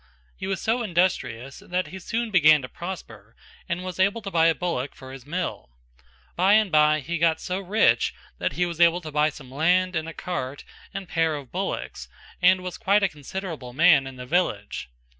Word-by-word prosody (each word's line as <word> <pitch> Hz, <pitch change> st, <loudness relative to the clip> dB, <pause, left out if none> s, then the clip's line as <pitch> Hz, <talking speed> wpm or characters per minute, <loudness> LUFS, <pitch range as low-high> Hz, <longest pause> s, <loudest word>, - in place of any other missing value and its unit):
He 190 Hz, -, -6 dB
was 195 Hz, -1 st, -1 dB
so 230 Hz, +3 st, 0 dB
industrious 170 Hz, -, -1 dB
that 180 Hz, +1 st, -3 dB
he 190 Hz, -, -8 dB
soon 225 Hz, +4 st, -3 dB
began 155 Hz, -6 st, +6 dB
to -, -, -5 dB
prosper 175 Hz, +6 st, -8 dB, 0.3 s
and 175 Hz, +1 st, -2 dB
was 185 Hz, -1 st, -6 dB
able 200 Hz, +4 st, +2 dB
to 195 Hz, -, -5 dB
buy 165 Hz, -2 st, +4 dB
a 165 Hz, -, +3 dB
bullock 155 Hz, -7 st, -3 dB
for 130 Hz, -1 st, -11 dB
his 135 Hz, 0 st, -11 dB
mill. 170 Hz, -, -4 dB, 0.7 s
By 190 Hz, +3 st, +4 dB
and 215 Hz, -3 st, +4 dB
bye 150 Hz, 0 st, +4 dB
he 170 Hz, +4 st, -3 dB
got 165 Hz, -1 st, +3 dB
so 185 Hz, +1 st, -3 dB
rich 200 Hz, +3 st, +2 dB, 0.2 s
that -, -, -1 dB
he 180 Hz, -, +1 dB
was 170 Hz, -1 st, -4 dB
able 170 Hz, +1 st, +5 dB
to 155 Hz, -2 st, -8 dB
buy 150 Hz, +1 st, +3 dB
some 135 Hz, -3 st, -12 dB
land 180 Hz, +5 st, +2 dB
and 160 Hz, 0 st, -2 dB
a -, -, -8 dB
cart 145 Hz, -7 st, -5 dB, 0.3 s
and 195 Hz, -1 st, -6 dB
pair 165 Hz, -2 st, +1 dB
of 140 Hz, -4 st, -9 dB
bullocks -, -, -4 dB, 0.3 s
and 185 Hz, +1 st, +5 dB
was 180 Hz, -1 st, -6 dB
quite 205 Hz, -1 st, +3 dB
a 195 Hz, -, +3 dB
considerable 150 Hz, -3 st, -7 dB
man 155 Hz, -2 st, +5 dB
in 135 Hz, -, -9 dB
the 125 Hz, 0 st, -8 dB
village. 125 Hz, -, -1 dB
170 Hz, 200 wpm, -25 LUFS, 150-185 Hz, 0.7 s, began